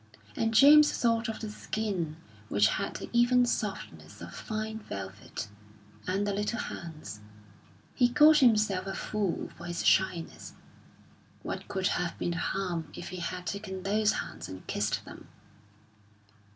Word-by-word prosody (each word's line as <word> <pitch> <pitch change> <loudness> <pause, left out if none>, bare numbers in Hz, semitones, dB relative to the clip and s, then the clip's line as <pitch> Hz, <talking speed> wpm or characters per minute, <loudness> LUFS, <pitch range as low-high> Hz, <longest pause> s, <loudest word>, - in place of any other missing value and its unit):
And 225 - +1
James 295 +6 +8
thought 230 0 +1
of 220 - -5
the 215 - -4
skin 195 -8 -3 0.3
which 105 +1 +4
had - - -2
the - - -5
even 245 +1 +5
softness 210 -4 -4
of - - -9
fine 220 0 -4
velvet, 100 - -7 0.6
and 195 +2 0
the 205 - 0
little 210 +3 -1
hands. 160 - -6 0.7
He 245 -1 +3
called 300 +5 +7
himself 210 -8 +3
a 195 - -3
fool 205 -5 -2
for 170 - -9
his 175 0 -3
shyness. 180 -3 +1 0.9
What - - -5
could 190 -1 -2
have 180 -3 0
been 175 - -1
the 170 - -3
harm 180 -4 -2
if - - -7
he 185 - -6
had 180 +1 -4
taken 190 0 -5
those 210 +2 +2
hands - - -5
and 95 0 -9
kissed 105 +1 -1
them? - - -11
200 Hz, 150 wpm, -29 LUFS, 175-225 Hz, 0.9 s, James